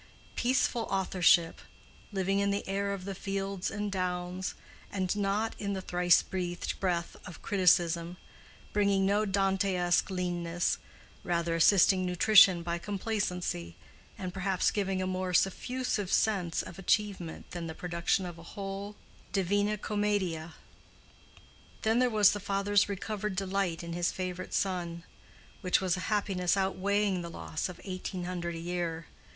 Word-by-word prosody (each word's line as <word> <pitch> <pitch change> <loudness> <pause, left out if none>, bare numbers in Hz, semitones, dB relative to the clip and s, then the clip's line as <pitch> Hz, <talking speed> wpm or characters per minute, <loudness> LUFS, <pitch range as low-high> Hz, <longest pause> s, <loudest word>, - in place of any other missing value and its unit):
Peaceful 245 -2 +1
authorship!—living 190 +1 +1
in 200 0 +2
the 200 0 -2
air 200 +1 -1
of 195 -2 -5
the 195 - -3
fields 195 0 -3
and 205 0 -3
downs, 180 0 -2 0.4
and 190 -1 -1
not 205 +2 0
in 200 -1 -2
the 190 - -3
thrice 175 -1 +4
breathed 175 -2 -3
breath 175 -3 -1
of 175 - -11
criticism—bringing 180 +2 +1
no 205 +2 +2
Dantesque 190 -2 +1
leanness; 175 -2 -1 0.4
rather, 170 -1 0
assisting 185 +2 +5
nutrition 185 0 +6
by 170 0 -2
complacency, 180 - -2 0.4
and 185 -2 -5
perhaps 190 -1 +1
giving 195 -2 -1
a - - -1
more 185 0 -2
suffusive 205 +2 0
sense 185 -6 +1
of 180 0 -10
achievement 195 -4 -1
than 170 -2 -5
the 160 - -6
production 175 +2 0
of 175 -2 -7
a 170 - -12
whole 200 +1 -5 0.4
Divina 205 +2 +1
Commedia. 195 -6 -1 1.3
Then 225 +2 +3
there 250 0 +4
was 210 -3 +5
the 205 - -3
father's 200 +1 +1
recovered 205 0 -3
delight 190 -3 -1
in 170 0 -5
his 175 0 0
favorite 185 -1 -4
son, 175 -3 -2 0.6
which 180 - +3
was 185 -2 +1
a - - -5
happiness 195 -3 +1
outweighing 195 0 +1
the 170 - -6
loss 160 +1 -4
of 180 - -9
eighteen 185 -1 -5
hundred 175 -1 -3
a - - -5
year. 170 -1 -3
190 Hz, 135 wpm, -30 LUFS, 175-200 Hz, 1.3 s, nutrition